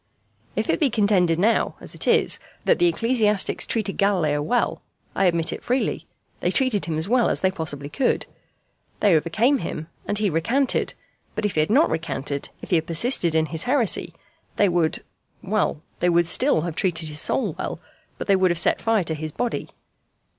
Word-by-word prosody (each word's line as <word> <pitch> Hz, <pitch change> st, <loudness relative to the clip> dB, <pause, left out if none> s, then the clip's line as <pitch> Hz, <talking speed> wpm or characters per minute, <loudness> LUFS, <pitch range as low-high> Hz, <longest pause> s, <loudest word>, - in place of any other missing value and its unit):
If -, -, -1 dB
it -, -, +1 dB
be 295 Hz, -5 st, +3 dB
contended 200 Hz, -7 st, +2 dB
now, 220 Hz, +6 st, +2 dB
as -, -, -8 dB
it -, -, -3 dB
is, -, -, +3 dB, 0.3 s
that -, -, +3 dB
the 350 Hz, -, +4 dB
ecclesiastics 230 Hz, -, +1 dB
treated 215 Hz, -4 st, -2 dB
Galileo 170 Hz, -8 st, +1 dB
well, 240 Hz, +11 st, 0 dB, 0.3 s
I 195 Hz, -, +1 dB
admit 170 Hz, -2 st, +1 dB
it -, -, -8 dB
freely: 255 Hz, +2 st, -1 dB, 0.3 s
they -, -, 0 dB
treated 255 Hz, -7 st, +1 dB
him 160 Hz, -2 st, -2 dB
as 160 Hz, +3 st, +1 dB
well 245 Hz, +2 st, +3 dB
as -, -, -1 dB
they 190 Hz, -, +2 dB
possibly 150 Hz, -6 st, -5 dB
could. 250 Hz, -, 0 dB, 0.7 s
They 205 Hz, -3 st, +4 dB
overcame 215 Hz, -, +2 dB
him, 155 Hz, +1 st, -5 dB, 0.2 s
and 205 Hz, -, -1 dB
he 210 Hz, 0 st, +1 dB
recanted; 240 Hz, -, 0 dB, 0.4 s
but -, -, -2 dB
if 210 Hz, -, -1 dB
he -, -, 0 dB
had 155 Hz, -, +2 dB
not 275 Hz, +9 st, +4 dB
recanted, 140 Hz, -3 st, -3 dB
if -, -, -9 dB
he 175 Hz, -, +5 dB
had 160 Hz, 0 st, -2 dB
persisted 170 Hz, -1 st, +2 dB
in 160 Hz, 0 st, +3 dB
his 160 Hz, -, -1 dB
heresy, 250 Hz, -5 st, +1 dB, 0.4 s
they 205 Hz, -, +3 dB
would 170 Hz, -3 st, 0 dB, 0.4 s
well, 195 Hz, -6 st, -1 dB, 0.2 s
they 175 Hz, -, +2 dB
would 170 Hz, 0 st, +3 dB
still 250 Hz, -, +2 dB
have 170 Hz, -1 st, -4 dB
treated 165 Hz, -4 st, 0 dB
his 150 Hz, 0 st, -3 dB
soul 215 Hz, -11 st, 0 dB
well, -, -, -4 dB, 0.4 s
but -, -, -5 dB
they 200 Hz, -, +4 dB
would 190 Hz, -1 st, +3 dB
have 170 Hz, -, 0 dB
set -, -, +1 dB
fire 225 Hz, -4 st, +2 dB
to 160 Hz, -, -3 dB
his 155 Hz, 0 st, -4 dB
body. 240 Hz, +9 st, -3 dB
185 Hz, 195 wpm, -23 LUFS, 160-225 Hz, 0.7 s, he